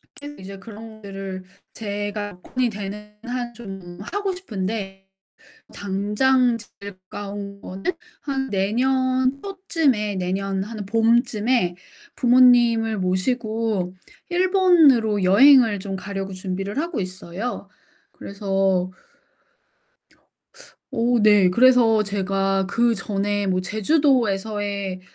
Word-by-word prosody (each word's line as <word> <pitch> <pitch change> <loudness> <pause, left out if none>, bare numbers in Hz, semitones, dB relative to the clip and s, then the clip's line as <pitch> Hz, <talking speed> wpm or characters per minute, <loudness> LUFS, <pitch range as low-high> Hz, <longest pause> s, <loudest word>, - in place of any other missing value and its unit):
계속 290 0 0
이제 195 +1 -9
그런 220 +2 -11
것들을 195 -2 -7 0.3
제가 205 -2 -5
돈이 255 +3 -1
되는 210 +1 -8
한 245 -1 -4
좀 195 -6 -10
하고 395 - -3
싶은데 195 - -5 0.7
당장 220 +6 +1
제일 200 -2 -11 0.2
가까운 200 0 -7
거는 190 +1 -9 0.4
한 270 -2 -3
내년 255 +6 +1
초쯤에 325 - -1
내년 190 +1 -2
한 210 -1 -7
봄쯤에 225 -2 +2 0.4
부모님을 240 -3 +4
모시고 215 0 -1 0.3
일본으로 345 - +4
여행을 225 +2 +6
좀 195 0 -5
가려고 195 0 -5
준비를 190 +4 -5
하고 335 -2 -2
있어요. 185 +5 -6 0.4
그래서 195 -2 -1 2.0
어우 235 0 +1
네 205 -3 +5
그래서 230 0 +5
제가 195 -1 0
그전에 205 -2 0
뭐 185 -1 +1
제주도에서의 205 - 0
210 Hz, 215 characters per minute, -22 LUFS, 195-245 Hz, 2.0 s, 여행을